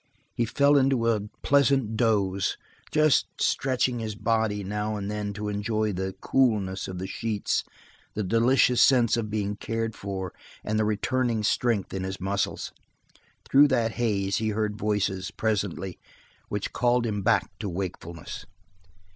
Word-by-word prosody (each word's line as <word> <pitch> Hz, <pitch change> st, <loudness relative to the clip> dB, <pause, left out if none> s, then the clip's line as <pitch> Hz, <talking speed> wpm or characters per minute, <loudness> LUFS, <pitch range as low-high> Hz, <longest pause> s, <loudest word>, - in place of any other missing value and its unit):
He 120 Hz, -, 0 dB
fell 140 Hz, +5 st, +4 dB
into 130 Hz, -4 st, +2 dB
a 105 Hz, -2 st, 0 dB, 0.2 s
pleasant 135 Hz, -5 st, +3 dB
doze, 100 Hz, -4 st, +1 dB, 0.3 s
just 155 Hz, -2 st, +4 dB
stretching 130 Hz, -2 st, +1 dB
his 110 Hz, -2 st, -4 dB
body 110 Hz, -1 st, 0 dB
now 105 Hz, +2 st, -2 dB
and 100 Hz, 0 st, -4 dB
then 105 Hz, -1 st, -3 dB
to 105 Hz, +1 st, -5 dB
enjoy 105 Hz, +1 st, -1 dB
the 95 Hz, +1 st, -3 dB
coolness 105 Hz, -8 st, +1 dB
of 95 Hz, -, -6 dB
the 95 Hz, -, -4 dB
sheets, 105 Hz, +1 st, -1 dB, 0.5 s
the 105 Hz, -, -1 dB
delicious 120 Hz, +4 st, +3 dB
sense 120 Hz, -4 st, +5 dB
of 115 Hz, -2 st, -2 dB
being 105 Hz, -1 st, -2 dB
cared 115 Hz, +1 st, -3 dB
for 95 Hz, -2 st, -5 dB, 0.3 s
and 110 Hz, 0 st, -1 dB
the 110 Hz, -, +2 dB
returning 115 Hz, +2 st, 0 dB
strength 115 Hz, -2 st, +1 dB
in 95 Hz, -1 st, -3 dB
his 95 Hz, 0 st, -4 dB
muscles. 100 Hz, +1 st, -2 dB, 0.8 s
Through 145 Hz, +2 st, +6 dB
that 120 Hz, -5 st, +1 dB
haze 100 Hz, -5 st, 0 dB
he 110 Hz, 0 st, 0 dB
heard 105 Hz, 0 st, -1 dB
voices, 105 Hz, -3 st, -1 dB
presently, 100 Hz, -4 st, -2 dB, 0.5 s
which 105 Hz, -1 st, -3 dB
called 120 Hz, 0 st, +2 dB
him 105 Hz, -3 st, -2 dB
back -, -, +2 dB
to 105 Hz, -, -3 dB
wakefulness. 85 Hz, -1 st, -6 dB
105 Hz, 145 wpm, -26 LUFS, 100-115 Hz, 0.8 s, Through